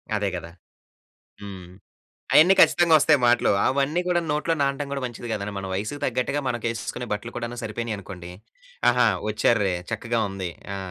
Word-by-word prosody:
అదే 105 Hz, -1 st, 0 dB
గదా! 85 Hz, -1 st, -7 dB, 0.9 s
హ్మ్. 95 Hz, -3 st, -9 dB, 0.7 s
అయన్నీ 175 Hz, +5 st, +7 dB
ఖచ్చితంగొస్తయి 155 Hz, -4 st, +5 dB
మాటలు. 120 Hz, 0 st, +4 dB
అవన్నీ 140 Hz, +5 st, +1 dB
కూడాను 175 Hz, -2 st, 0 dB
నోట్లో 150 Hz, +2 st, 0 dB
నానటం 140 Hz, +1 st, 0 dB
గూడా 140 Hz, -1 st, -3 dB
మంచిది 120 Hz, 0 st, -7 dB
కాదండి. 105 Hz, -1 st, -3 dB
మన 95 Hz, -, -5 dB
వయసుకు 110 Hz, +9 st, -3 dB
తగ్గట్టుగా 130 Hz, +3 st, -1 dB
మనకేసేసుకునే 120 Hz, 0 st, -3 dB
బట్టలు 110 Hz, +3 st, -6 dB
కూడాను 120 Hz, 0 st, -5 dB
సరిపోయినియనుకోండి, 105 Hz, -5 st, -6 dB, 0.6 s
ఆహా! 125 Hz, -1 st, +3 dB, 0.2 s
ఒచ్చార్రే. 105 Hz, -3 st, +2 dB, 0.2 s
చక్కగా 115 Hz, +1 st, -1 dB
ఉంది. 95 Hz, -2 st, -4 dB, 0.3 s
ఆ! -, -, -4 dB
120 Hz, 140 wpm, -24 LUFS, 105-140 Hz, 0.9 s, అయన్నీ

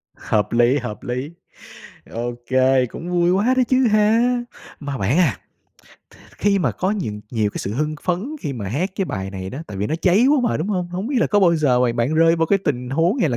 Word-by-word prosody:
Hợp 105 Hz, -2 st, -1 dB
lý, 120 Hz, +4 st, +4 dB
hợp 120 Hz, -5 st, -6 dB
lý. 125 Hz, +5 st, -4 dB, 0.8 s
Ô 120 Hz, +1 st, -3 dB, 0.2 s
kê, 130 Hz, 0 st, +3 dB
cũng 165 Hz, +8 st, -8 dB
vui 175 Hz, 0 st, +2 dB
quá 205 Hz, +7 st, +2 dB
đó 255 Hz, -, +5 dB
chứ 255 Hz, -1 st, +3 dB
ha. 225 Hz, +3 st, +3 dB, 0.4 s
Mà 145 Hz, -2 st, -5 dB
bạn 120 Hz, -, 0 dB
à, 165 Hz, -9 st, +2 dB, 0.8 s
th -, -, -19 dB, 0.2 s
khi 200 Hz, -1 st, +2 dB
mà 145 Hz, -, 0 dB
có 185 Hz, -, -1 dB
những 165 Hz, -, -3 dB
nhiều 110 Hz, -4 st, 0 dB
cái -, -, -6 dB
sự 100 Hz, -, -4 dB
hưng 150 Hz, +3 st, -1 dB
phấn 195 Hz, -, -2 dB
khi 145 Hz, -5 st, -3 dB
mà 110 Hz, -7 st, -5 dB
hát 160 Hz, -, -1 dB
cái 195 Hz, -, 0 dB
bài 95 Hz, -, -4 dB
này 95 Hz, -1 st, -6 dB
đó, 135 Hz, -, -7 dB
tại 100 Hz, -, -8 dB
vì 100 Hz, -, -1 dB
nó 155 Hz, -, -2 dB
cháy 195 Hz, +7 st, +4 dB
quá 295 Hz, +1 st, +4 dB
mà, -, -, 0 dB
đúng 160 Hz, +6 st, -3 dB
hông? 180 Hz, -4 st, -1 dB
Hông 180 Hz, +4 st, -4 dB
biết 275 Hz, +1 st, -2 dB
là -, -, +3 dB
có 205 Hz, -, +2 dB
bao 175 Hz, -3 st, +4 dB
giờ 135 Hz, -5 st, +2 dB
mà 125 Hz, -2 st, +2 dB
bạn 120 Hz, +6 st, 0 dB
rơi 165 Hz, +1 st, +4 dB
vô 165 Hz, 0 st, +1 dB
cái 200 Hz, -, +3 dB
tình 125 Hz, -3 st, -2 dB
huống 165 Hz, -, +1 dB
hay 170 Hz, -, +2 dB
là 120 Hz, -, -1 dB
155 Hz, 245 wpm, -21 LUFS, 120-195 Hz, 0.8 s, đó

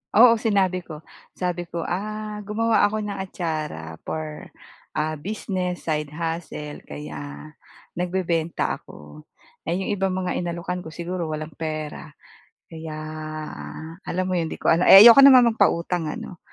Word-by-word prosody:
Oo, 230 Hz, +1 st, +8 dB
sinabi 195 Hz, -5 st, +1 dB
ko. 155 Hz, -2 st, -9 dB, 0.3 s
Sabi 180 Hz, -1 st, -3 dB
ko, 170 Hz, -1 st, -3 dB
"ah, 210 Hz, +2 st, -4 dB
gumawa 220 Hz, +2 st, +1 dB
ako 215 Hz, +1 st, +2 dB
ng 205 Hz, -1 st, -4 dB
atsara 155 Hz, -, -4 dB
for, 155 Hz, -1 st, -5 dB, 0.5 s
ah, 155 Hz, 0 st, -1 dB
business, 180 Hz, 0 st, -4 dB
side 150 Hz, -2 st, -1 dB
hustle 160 Hz, -2 st, -5 dB
kaya 75 Hz, 0 st, -8 dB, 0.5 s
nagbebenta 175 Hz, -2 st, -1 dB
ako. 75 Hz, 0 st, -14 dB, 0.4 s
Eh, 170 Hz, +4 st, -1 dB
yung 190 Hz, -, -3 dB
ibang 195 Hz, -2 st, 0 dB
mga 185 Hz, -1 st, -2 dB
inalokan 175 Hz, +1 st, -3 dB
ko 160 Hz, -, -9 dB
siguro 170 Hz, -1 st, -4 dB
walang 155 Hz, +1 st, -5 dB
pera 155 Hz, -1 st, -5 dB, 0.6 s
kaya 160 Hz, -1 st, -7 dB, 1.1 s
alam 185 Hz, +1 st, -1 dB
mo 185 Hz, -1 st, 0 dB
'yon 165 Hz, -, -1 dB
'di -, -, -5 dB
ko -, -, +1 dB
alam 170 Hz, +2 st, +3 dB
eh 195 Hz, +1 st, +11 dB
ayoko 235 Hz, +3 st, +10 dB
naman 255 Hz, -4 st, +8 dB
magpautang 170 Hz, -5 st, +1 dB
ano, 165 Hz, +2 st, -7 dB
175 Hz, 140 wpm, -24 LUFS, 155-195 Hz, 1.1 s, eh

